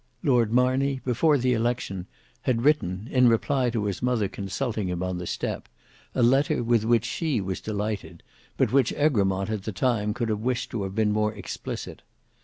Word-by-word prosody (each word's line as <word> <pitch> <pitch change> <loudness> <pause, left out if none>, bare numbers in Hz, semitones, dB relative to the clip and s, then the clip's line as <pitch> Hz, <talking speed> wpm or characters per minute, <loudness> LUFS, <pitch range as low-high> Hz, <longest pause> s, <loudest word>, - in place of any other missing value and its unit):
Lord 120 -6 +3
Marney, 130 +2 +2
before 145 +5 +3
the 125 -1 +2
election, 115 -6 -2 0.3
had 120 -2 0
written, 110 -9 +1
in 125 -1 +5
reply 125 +2 +2
to 115 -3 -1
his 100 -3 -3
mother 125 -5 +1
consulting 105 +2 -3
him 90 0 -2
on 90 -1 -2
the 90 - -5
step - - -3 0.5
a - - +2
letter 135 +1 +3
with 115 -2 +2
which 115 0 +3
she 155 -8 -1
was 95 -1 -3
delighted, 105 -5 -4 0.3
but - - +2
which 135 -3 +4
Egremont 100 -9 +1
at 105 -2 -2
the 110 - -4
time 105 0 0
could 115 -1 -2
have 105 -1 0
wished 125 +2 -2
to 115 - -2
have 95 0 -4
been 110 -1 +2
more 105 0 0
explicit. - - -6
115 Hz, 185 wpm, -26 LUFS, 100-125 Hz, 0.5 s, in